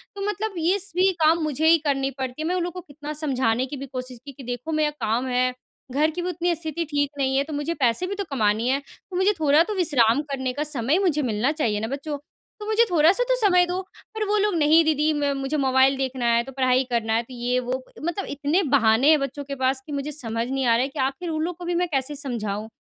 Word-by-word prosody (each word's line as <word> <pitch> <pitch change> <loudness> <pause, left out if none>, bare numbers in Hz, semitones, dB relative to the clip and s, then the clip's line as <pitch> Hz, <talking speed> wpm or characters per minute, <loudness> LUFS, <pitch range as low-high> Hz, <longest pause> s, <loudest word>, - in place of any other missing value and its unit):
तो 400 - -6
मतलब 415 +1 -2
ये 340 +4 +2 0.2
भी 375 +1 +4
काम 320 +2 +4
मुझे 305 +1 0
ही 330 +1 +7
करनी 275 -1 0
पड़ती 260 +2 -4
है। 315 - -2
मैं 360 - 0
उन 360 - 0
लोग 350 -1 -4
को 360 - -6
कितना 295 -1 -8
समझाने 260 -5 0
की 280 +2 -7
भी 275 - -6
कोशिश 255 -2 -7
की, 280 - -7
कि, 270 0 -12
"देखो, 245 +5 -5
मेरा 310 -1 +2 0.2
काम 235 +4 0
है, 250 0 +1 0.4
घर 295 +4 +2
की 350 +3 -4
भी 355 - -2
उतनी 350 0 0
स्थिति 320 +1 -4
ठीक 290 -2 0
नहीं 265 -1 0
है, 275 - +3
तो 305 +2 -8
मुझे 295 +3 -2
पैसे 270 +3 +1
भी 400 - -3
तो 400 - -3
कमाने 220 -2 +1
हैं। 275 +2 +1 0.3
तो 370 - -7
मुझे 380 +3 +3
थोड़ा 300 0 +5
तो 425 - -4
विश्राम 285 - +3
करने 260 -2 -2
का 290 +3 -2
समय 295 +1 +1
मुझे 340 -7 +1
मिलना 240 +1 0
चाहिए 235 -10 -1
ना, 220 - -3
बच्चों। 285 +3 -4 0.4
तो 420 - -7
मुझे 440 +2 +3
थोड़ा-सा 345 +8 +4
तो - - +4
समय 360 -2 +5
दो।" 360 +1 -2 0.3
पर 435 - -1
वो 420 +1 +2
लोग, 415 -2 +1
"नहीं, 320 +1 +5
दीदी, 310 0 +2
म 290 -1 0
मुझे 275 +3 -2
मोबाइल 265 +1 +4
देखना 260 -3 0
है, 235 - +2
तो 270 - -10
पढ़ाई 255 -1 +2
करना 225 -2 0
है।" 230 - +1
तो 255 - -13
ये-वो, 250 +1 -2 0.2
मतलब 345 +5 -3
इतने 300 +7 +1
बहाने 230 +2 +4
हैं 310 -1 +6
बच्चों 275 +1 -4
के 280 0 -6
पास 265 0 0
कि - - -9
मुझे 285 +1 -3
समझ 230 -5 -3
नहीं 270 0 -1
आ 235 - +4
रहा 235 - +2
है - - -1
कि 280 - -8
आख़िर 270 +6 -1
उन 315 -1 -2
लोग 345 0 -3
को 355 - -8
भी 350 0 -1
मैं 355 +1 +1
कैसे 270 +2 -1
समझाऊँ? 220 -7 -3
285 Hz, 260 wpm, -24 LUFS, 255-330 Hz, 0.4 s, ही